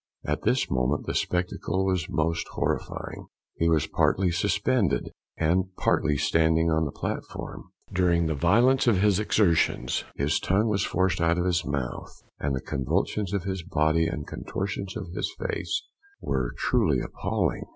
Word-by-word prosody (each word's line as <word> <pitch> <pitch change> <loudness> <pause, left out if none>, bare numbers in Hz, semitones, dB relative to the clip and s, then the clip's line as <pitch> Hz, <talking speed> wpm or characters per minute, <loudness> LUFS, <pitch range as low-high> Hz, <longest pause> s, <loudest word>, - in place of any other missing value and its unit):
At - - -1
this - - +2
moment 65 +2 0
the - - -2
spectacle 90 +1 -1
was 95 -4 0
most 85 0 0
horrifying - - -3 0.3
he 85 - +1
was 80 -3 +3
partly 95 -2 +2
suspended, 100 - +1 0.3
and 85 +4 +2
partly 75 -2 +2
standing 80 +2 +2
on 80 0 +2
the 70 - -3
platform. - - -5 0.3
During 85 -2 +3
the 80 - 0
violence 115 - +3
of 110 -5 +5
his 100 -1 +3
exertions, 85 - +2
his 70 +3 +1
tongue 105 +4 +1
was 100 -2 +1
forced 95 -1 +1
out 85 +1 +3
of 90 - 0
his 90 -2 +1
mouth, 70 -4 -4 0.2
and 70 -1 -1
the 65 - -3
convulsions 85 +8 -1
of 100 -3 -1
his 95 -1 -3
body 80 -2 +1
and 75 -3 -4
contortions 95 0 -4
of 95 -5 -6
his - - -2
face - - -2 0.4
were - - -1
truly - - +2
appalling. - - -2
85 Hz, 155 wpm, -26 LUFS, 80-95 Hz, 0.4 s, of